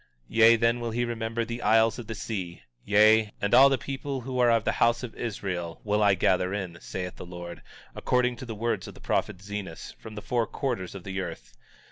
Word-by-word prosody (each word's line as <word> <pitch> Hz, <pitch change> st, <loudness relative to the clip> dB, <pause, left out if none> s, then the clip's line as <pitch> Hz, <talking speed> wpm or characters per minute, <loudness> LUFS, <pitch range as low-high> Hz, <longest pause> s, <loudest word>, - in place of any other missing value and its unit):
19:16 -, -, -6 dB
Yea, 115 Hz, +1 st, +8 dB
then 115 Hz, +1 st, +2 dB
will 120 Hz, -1 st, -3 dB
he 120 Hz, +2 st, -1 dB
remember 115 Hz, 0 st, -2 dB
the 120 Hz, +1 st, -5 dB
isles 110 Hz, +2 st, +3 dB
of 115 Hz, -, -8 dB
the 115 Hz, -, -5 dB
sea; 95 Hz, -6 st, -5 dB, 0.2 s
yea, 105 Hz, +1 st, +5 dB
and 100 Hz, +2 st, -1 dB
all 135 Hz, +3 st, +8 dB
the 135 Hz, -, +2 dB
people 135 Hz, +1 st, -5 dB
who 130 Hz, +1 st, -4 dB
are 120 Hz, -1 st, +5 dB
of 115 Hz, -2 st, +3 dB
the -, -, +1 dB
house 120 Hz, +1 st, +3 dB
of 120 Hz, -, -6 dB
Israel, 95 Hz, -7 st, -4 dB
will 105 Hz, 0 st, +1 dB
I 100 Hz, -2 st, +5 dB
gather 90 Hz, +1 st, +1 dB
in, 90 Hz, -4 st, -5 dB
saith 90 Hz, -1 st, -6 dB
the -, -, -8 dB
Lord, 85 Hz, -1 st, -8 dB, 0.3 s
according 125 Hz, -1 st, +1 dB
to 130 Hz, -, -8 dB
the 115 Hz, -, -5 dB
words 115 Hz, +2 st, -2 dB
of -, -, -10 dB
the -, -, -14 dB
prophet 90 Hz, -, -2 dB
Zenos, 100 Hz, -4 st, -6 dB
from 110 Hz, -1 st, -10 dB
the 105 Hz, -, -7 dB
four 120 Hz, -2 st, 0 dB
quarters 120 Hz, -10 st, -3 dB
of 95 Hz, -, -8 dB
the 95 Hz, 0 st, -4 dB
earth. -, -, -8 dB
110 Hz, 225 wpm, -27 LUFS, 95-120 Hz, 0.3 s, Yea